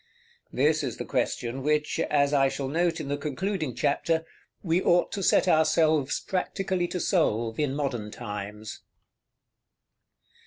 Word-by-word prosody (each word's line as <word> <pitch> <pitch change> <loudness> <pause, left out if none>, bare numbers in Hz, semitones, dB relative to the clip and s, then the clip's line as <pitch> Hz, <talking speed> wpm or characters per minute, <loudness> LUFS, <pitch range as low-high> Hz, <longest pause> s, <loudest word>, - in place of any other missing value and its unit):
This 150 +4 +2
is 125 -5 -3
the - - -5
question 120 +3 -2
which, 150 +2 0
as 140 -1 +2
I 135 -1 +4
shall 135 0 -4
note 170 +3 0
in 145 - -5
the 145 +1 -1
concluding 155 - -3
chapter, 160 +3 0 0.4
we 170 0 +1
ought 175 -1 +3
to 200 - -3
set 190 - +3
ourselves 155 -3 +3
practically 185 -1 -2
to 180 - -4
solve 115 - 0
in 145 -3 0
modern 125 -7 -2
times. 105 +1 -7
150 Hz, 140 wpm, -27 LUFS, 130-170 Hz, 0.4 s, I